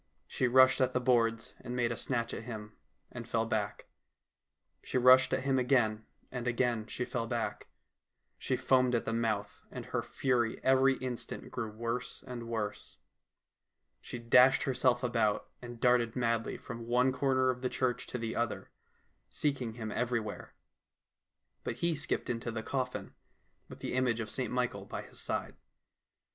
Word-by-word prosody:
She 130 - 0
rushed 130 +1 +6
at 130 - +2
the - - +2
boards 115 -2 +1
and 125 -1 -5
made 120 -1 +1
a - - -1
snatch 120 -2 -1
at - - -6
him, 105 -3 -7 0.4
and 120 -1 -7
fell 115 -1 +1
back; 110 -3 -2 1.0
she - - -2
rushed 130 +1 +7
at 130 - 0
him 135 -1 +2
again, 120 -4 +2 0.2
and 125 -1 -4
again 120 -2 0
she 125 - -3
fell 115 -2 -3
back. 115 -1 -3 0.7
She - - 0
foamed 130 -1 +3
at 115 - 0
the 115 - -1
mouth, 110 -3 -1
and - - -7
her - - -1
fury 120 -4 0
every 135 0 +5
instant 125 -2 -5
grew 115 -3 -3
worse 115 +3 -4
and 120 -2 -6
worse. 105 -3 -4 1.0
She - - -7
dashed 125 +3 +5
herself 125 -2 +2
about, 115 -4 +1
and 120 -1 -8
darted 125 -2 +3
madly 115 -2 0
from 115 -1 -8
one 125 +2 +3
corner 130 -1 +2
of 125 0 -7
the 130 - 0
church 125 -1 -1
to - - -4
the 115 -1 -3
other, 120 0 -2 0.6
seeking 130 -6 -1
him 110 -2 -5
everywhere. 115 -3 -3 1.1
But - - -3
he 170 0 0
skipped 145 -1 -2
into 115 0 -2
the 110 -1 -4
coffin, 130 0 -3 0.6
with - - -11
the - - -3
image 125 -2 +1
of 110 -2 -4
St - - -2
Michael - - -1
by - - -6
his - - -12
side. - - -3
120 Hz, 165 wpm, -32 LUFS, 115-130 Hz, 1.1 s, rushed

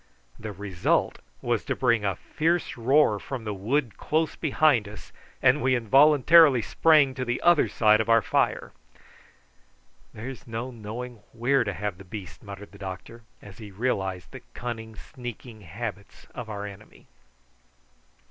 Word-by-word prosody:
The 110 -1 -6
result 95 -2 -1 0.2
was 120 -3 0
to - - -2
bring 120 -4 +2
a 100 -2 0
fierce 165 - -1
roar 125 -2 +3
from 130 0 -6
the 105 -1 -4
wood 115 +5 -1
close 160 +1 -1
behind 145 -7 +2
us, 105 - -12 0.3
and - - +4
we 130 +1 +2
involuntarily 140 +2 +5
sprang 150 -2 +4
to 130 -1 -4
the 120 -1 -2
other 175 -3 +4
side 110 -1 +4
of 110 - -4
our 115 -2 +5
fire. - - 0 1.4
"There's 125 +4 -9
no 115 +3 -5
knowing 120 +2 -7 0.2
where 125 +4 +2
to 100 - -3
have 100 -2 -4
the - - -10
beast," 95 -2 -9
muttered 100 0 -10
the 100 - -15
doctor, 95 +4 -8 0.2
as 100 +1 -13
he 105 -2 -9
realised 95 -4 -3
the - - -10
cunning 115 -2 -6
sneaking 120 -1 -10
habits 100 +2 -8
of 120 -2 -7
our 105 -1 -5
enemy. 105 +1 -12
115 Hz, 150 wpm, -26 LUFS, 105-130 Hz, 1.4 s, involuntarily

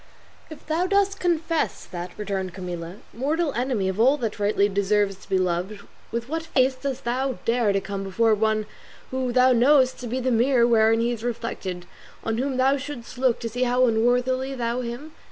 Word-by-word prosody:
"If 315 - -11
thou 330 +4 0
dost 400 0 +1
confess 330 -2 -1
that," 175 0 -6
returned 190 -3 -3
Camilla, 175 -2 -6 0.2
"mortal 295 +5 -1
enemy 245 -6 -1
of 190 +2 -3
all 265 +6 +5
that 225 -6 -4
rightly 205 0 +2
deserves 200 0 +1
to - - -18
be 190 - +2
loved, 185 +3 -1 0.3
with 235 +1 -3
what 325 +3 -2
face 265 -5 +2
dost 260 0 -5
thou 255 +2 -1
dare 230 -2 +2
to 195 - +1
come 195 0 -5
before 220 +4 +2
one 215 0 +1 0.5
whom 260 -1 -1
thou 255 +1 +5
knowest 260 +2 +4
to 250 - -6
be 250 +3 -2
the 255 0 0
mirror 240 +1 +4
wherein 225 -1 +4
he 235 +1 +1
is 230 -2 -5
reflected 225 -7 -4 0.4
on 225 0 -1
whom 265 0 -1
thou 265 +2 +3
shouldst 260 -3 -8
look 255 -3 +2
to 230 - -3
see 245 +3 -5
how 250 0 +3
unworthily 250 +3 +1
thou 240 0 -2
him? 245 +6 -6
240 Hz, 190 wpm, -24 LUFS, 210-260 Hz, 0.5 s, all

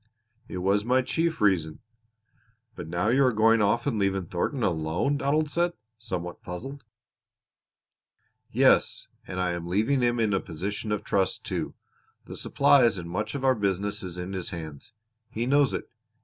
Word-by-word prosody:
"It - - -6
was 100 +3 +1
my 130 +3 +2
chief 165 +4 -1
reason." 85 -7 +2 1.0
"But - - -7
now 85 +5 0
you 135 +4 +4
are 130 - +4
going 115 0 +4
off 105 +3 +2
and 125 -7 0
leaving 95 -2 0
Thornton 115 - -2
alone," 85 - 0
Donald 150 +2 +1
said, 170 +3 0 0.3
somewhat 90 -5 -5
puzzled. 135 +10 -7 1.7
"Yes, - - +3 0.2
and 90 - -5
I 90 -1 +1
am 85 0 -4
leaving 110 +9 +1
him 120 -1 +1
in 110 -3 +2
a 95 - +2
position 100 +5 -5
of 105 - -1
trust, 95 -2 0
too. - - -4 0.5
The - - -8
supplies 130 -7 +4
and 85 -1 -6
much 105 +7 -3
of 135 -1 -3
our 130 - +5
business 100 -2 -1
is 90 -2 -6
in 90 +2 -5
his 95 -2 -3
hands. 80 +2 -8 0.4
He 115 +2 -3
knows 140 -1 +3
it. - - -4
105 Hz, 165 wpm, -27 LUFS, 90-130 Hz, 1.7 s, our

